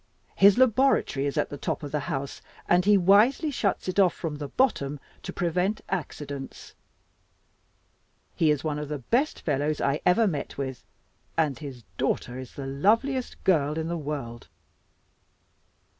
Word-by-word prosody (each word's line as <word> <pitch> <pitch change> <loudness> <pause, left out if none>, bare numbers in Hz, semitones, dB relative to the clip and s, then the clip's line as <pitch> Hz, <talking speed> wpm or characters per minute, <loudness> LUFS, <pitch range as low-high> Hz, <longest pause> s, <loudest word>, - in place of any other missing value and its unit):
His 200 +2 +6
laboratory 255 - +3
is 140 - -3
at - - +1
the 145 - -6
top - - -3
of 145 - -6
the 150 - 0
house, 140 -3 -4 0.3
and 175 +1 +3
he 205 0 +6
wisely 215 - +4
shuts 205 -8 -1
it 185 +2 0
off 185 -3 +4
from 155 -4 -4
the 145 -1 -5
bottom 145 - 0 0.2
to - - -6
prevent 180 +5 0
accidents. 145 -6 -5 1.6
He 160 - +3
is 150 -2 +1
one 150 -2 -2
of 150 -1 -5
the 150 - -2
best 240 - 0
fellows 150 0 0
I 140 +2 0
ever 200 +6 +4
met 155 -9 -3
with, 130 -2 -4 0.5
and 150 -6 +1
his 135 -5 -8 0.2
daughter 125 -1 -1
is 130 -2 -10
the 140 - -6
loveliest 230 - 0
girl 150 -4 +2
in 160 0 -2
the 170 - -1
world. 140 - -5
155 Hz, 160 wpm, -26 LUFS, 140-200 Hz, 1.6 s, His